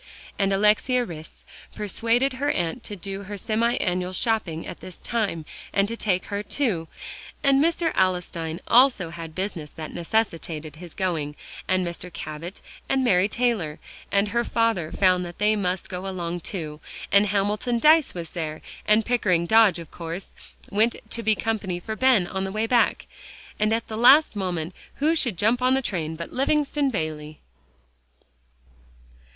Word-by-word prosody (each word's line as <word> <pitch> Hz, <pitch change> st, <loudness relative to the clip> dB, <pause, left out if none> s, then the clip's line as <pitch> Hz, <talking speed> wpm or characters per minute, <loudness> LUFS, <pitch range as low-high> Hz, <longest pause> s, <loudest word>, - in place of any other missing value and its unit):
And 195 Hz, -1 st, +2 dB
Alexia 210 Hz, +5 st, +3 dB
Rhys 160 Hz, -4 st, -10 dB, 0.3 s
persuaded 230 Hz, +6 st, +1 dB
her 280 Hz, +3 st, -1 dB
aunt 175 Hz, -, -1 dB
to 210 Hz, -, -5 dB
do 195 Hz, +1 st, -6 dB
her 205 Hz, +1 st, -6 dB
semi 225 Hz, +4 st, +1 dB
annual 180 Hz, 0 st, -1 dB
shopping 185 Hz, -6 st, 0 dB
at -, -, -8 dB
this 185 Hz, -, -10 dB
time, 205 Hz, -9 st, -2 dB, 0.3 s
and 200 Hz, 0 st, +2 dB
to 230 Hz, -, -3 dB
take 185 Hz, -5 st, 0 dB
her 200 Hz, 0 st, -3 dB
too; 210 Hz, -, -1 dB, 0.6 s
and 275 Hz, 0 st, +5 dB
Mr. 335 Hz, 0 st, +1 dB
Alstyne 180 Hz, -3 st, 0 dB
also 240 Hz, -9 st, +5 dB
had 165 Hz, -2 st, -8 dB
business 185 Hz, -5 st, -3 dB
that 155 Hz, +1 st, -8 dB
necessitated 165 Hz, -5 st, -2 dB
his 175 Hz, -1 st, -10 dB
going, 160 Hz, -6 st, -2 dB, 0.3 s
and 185 Hz, -1 st, +2 dB
Mr. 175 Hz, +1 st, -5 dB
Cabot 155 Hz, +4 st, -7 dB, 0.3 s
and 270 Hz, -1 st, +2 dB
Mary 190 Hz, -5 st, +4 dB
Taylor, 215 Hz, -10 st, 0 dB, 0.3 s
and 200 Hz, +1 st, +3 dB
her 235 Hz, +2 st, +1 dB
father 230 Hz, -10 st, 0 dB
found 185 Hz, -2 st, +3 dB
they 210 Hz, +5 st, +1 dB
must 185 Hz, -2 st, -1 dB
go 185 Hz, +1 st, -5 dB
along 175 Hz, -2 st, -3 dB
too; 155 Hz, -4 st, -5 dB, 0.3 s
and 200 Hz, +1 st, +5 dB
Hamilton 205 Hz, +4 st, 0 dB
Dyce 305 Hz, -, +5 dB
was 170 Hz, -2 st, -5 dB
there, 155 Hz, -3 st, -5 dB, 0.2 s
and 215 Hz, +1 st, +4 dB
Pickering 185 Hz, -8 st, +2 dB
Dodge, 220 Hz, -2 st, +5 dB
of 165 Hz, -2 st, -9 dB
course, 170 Hz, +2 st, -6 dB, 0.4 s
went 220 Hz, +4 st, +2 dB, 0.2 s
to 230 Hz, -, -2 dB
be 220 Hz, -1 st, +3 dB
company 205 Hz, -5 st, -2 dB
for 220 Hz, +5 st, -5 dB
Ben 250 Hz, -5 st, +4 dB
on 190 Hz, +2 st, -3 dB
the 190 Hz, -, -3 dB
way 215 Hz, +2 st, 0 dB
back. 235 Hz, 0 st, +2 dB, 0.5 s
And 215 Hz, +1 st, +2 dB
at 225 Hz, +1 st, 0 dB
the 215 Hz, -, -5 dB
last 270 Hz, +4 st, +6 dB
moment 180 Hz, -4 st, -2 dB, 0.2 s
who 310 Hz, +4 st, +2 dB
should 240 Hz, -, +1 dB
jump 225 Hz, +7 st, +2 dB
on 255 Hz, +1 st, +4 dB
the 265 Hz, -, +1 dB
train 160 Hz, -7 st, -2 dB
but 170 Hz, +1 st, -7 dB
Livingston 290 Hz, +1 st, +1 dB
Bayley. 155 Hz, -7 st, -4 dB
195 Hz, 160 wpm, -25 LUFS, 170-230 Hz, 0.6 s, last